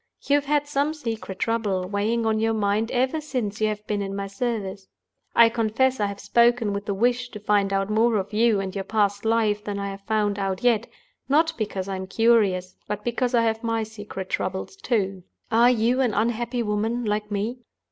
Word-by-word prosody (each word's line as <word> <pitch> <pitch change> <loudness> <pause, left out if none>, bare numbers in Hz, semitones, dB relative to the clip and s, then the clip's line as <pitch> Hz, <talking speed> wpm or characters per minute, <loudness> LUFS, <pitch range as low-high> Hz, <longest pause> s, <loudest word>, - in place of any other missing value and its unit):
You 280 - 0
have 290 0 +3
had 290 0 +1
some 290 +2 0
secret 225 -9 -5
trouble 205 -5 -1
weighing 215 +4 0
on 220 -1 +1
your 225 0 +1
mind 210 +1 +1
ever 260 +5 0
since 235 -8 -3
you 215 - +3
have 210 0 -4
been 205 -1 -1
in 195 0 -4
my 200 0 -3
service. 200 -2 -3 0.5
I 235 - +8
confess 230 +3 +1
I 205 - +2
have 200 0 -6
spoken 235 -2 +3
with 200 +1 -4
the 200 - 0
wish 245 +3 +1
to 210 - -8
find 205 -1 +1
out 195 0 +1
more 220 +2 +2
of 200 0 -2
you 220 -1 +3
and 190 -1 -4
your 195 - -3
past 205 0 0
life 220 -2 +2
than 205 -1 -4
I 200 0 -3
have 195 0 -8
found 205 -1 0
out 195 0 -2
yet—not 310 - 0
because 200 -5 -3
I 195 -1 -3
am 190 0 -6
curious, 200 -4 +2
but 210 0 -4
because 245 +1 0
I 230 - +4
have 225 0 0
my 230 -1 0
secret 210 -3 -8
troubles 190 - -3
too. 195 - -1 0.3
Are 235 +2 +6
you 245 +2 +2
an 240 -6 +1
unhappy 235 +2 0
woman, 225 +3 -1
like 210 0 -1
me? 215 +5 -2
220 Hz, 205 wpm, -24 LUFS, 200-235 Hz, 0.5 s, I